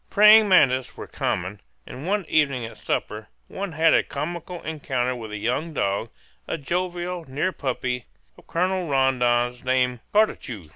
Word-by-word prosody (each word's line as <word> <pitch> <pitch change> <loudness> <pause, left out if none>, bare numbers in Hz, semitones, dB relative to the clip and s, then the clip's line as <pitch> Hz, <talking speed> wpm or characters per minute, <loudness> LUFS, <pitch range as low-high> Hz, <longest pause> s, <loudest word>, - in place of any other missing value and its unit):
Praying 210 +1 +7
mantes 130 -8 +3
were - - -6
common, 95 +3 -3 0.2
and 135 +6 -8
one 200 -1 0
evening 140 -6 +1
at 115 - -10
supper - - -3 0.2
one 195 -3 -5
had 160 +1 +4
a - - +5
comical 170 +4 -5
encounter 130 -5 -2
with 110 -3 -8
a 105 - -4
young 125 +10 -2
dog, 100 +2 -1 0.4
a - - -2
jovial 175 +3 -3
near 150 +7 -1
puppy, 125 -5 -3 0.3
of - - -20
Colonel 185 +1 0
Rondon's, 125 -3 +1
named 125 -1 +1
Cartucho. 165 - +1
140 Hz, 150 wpm, -24 LUFS, 125-175 Hz, 0.4 s, Praying